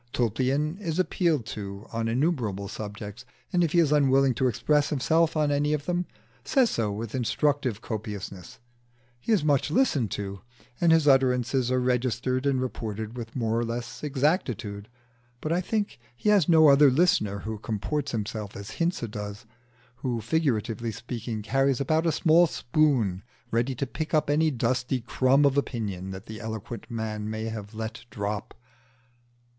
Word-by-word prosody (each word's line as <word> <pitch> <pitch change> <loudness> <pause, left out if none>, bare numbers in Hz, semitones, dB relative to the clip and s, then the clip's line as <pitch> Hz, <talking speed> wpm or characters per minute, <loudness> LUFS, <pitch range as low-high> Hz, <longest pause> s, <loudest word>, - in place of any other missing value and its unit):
Tulpian 135 - 0
is 170 -5 -3
appealed 170 - +1
to 100 -1 -6
on 115 0 -1
innumerable 115 - 0
subjects, 105 +2 -7 0.3
and 175 -1 +4
if 160 - 0
he - - +3
is 155 -4 +3
unwilling 135 -2 +4
to 130 +2 +1
express 145 +5 +2
himself 160 +3 +2
on 150 -1 +2
any 145 +1 +1
one 150 - +3
of 145 - -17
them, 180 0 0 0.4
says 245 - +3
so 110 -3 0
with 110 +2 -5
instructive 130 -1 0
copiousness: 100 -5 -6 0.6
he 125 - -3
is 205 -8 +3
much 145 -1 +2
listened 150 - +2
to, 100 0 -5 0.4
and 170 -1 +5
his 160 -2 +4
utterances 130 -2 +3
are 130 0 +2
registered 125 +1 0
and 135 -2 +2
reported 110 -2 -5
with 115 -2 -7
more 115 -2 0
or - - 0
less 120 +3 -5
exactitude. 130 - -1 0.5
But 155 - -3
I 175 +2 +2
think 205 - -2 0.2
he 210 - 0
has 200 -7 +4
no 160 -2 +7
other 140 +1 +7
listener 130 - +2
who 110 +1 -5
comports 135 +7 -2
himself 105 -2 -4
as 100 0 -7
Hinze 170 +1 0
does 105 +1 -7 0.5
who, 125 -1 -2
figuratively 115 -3 0
speaking, 115 -1 -5
carries 135 +4 +2
about 155 +4 +1
a - - +4
small 165 +2 +5
spoon 120 - +1 0.3
ready 120 +3 0
to 140 - -2
pick 155 +4 -3
up 150 -1 +2
any 155 +2 +3
dusty 125 0 0
crumb 130 +4 +3
of 140 0 +4
opinion 100 -9 -4
that 95 +2 -7
the 110 +1 -8
eloquent 110 +1 -6
man 110 -2 -3
may 110 0 -3
have 110 -1 -6
let 110 +2 -5
drop. 105 -2 -4
125 Hz, 165 wpm, -27 LUFS, 110-150 Hz, 0.6 s, no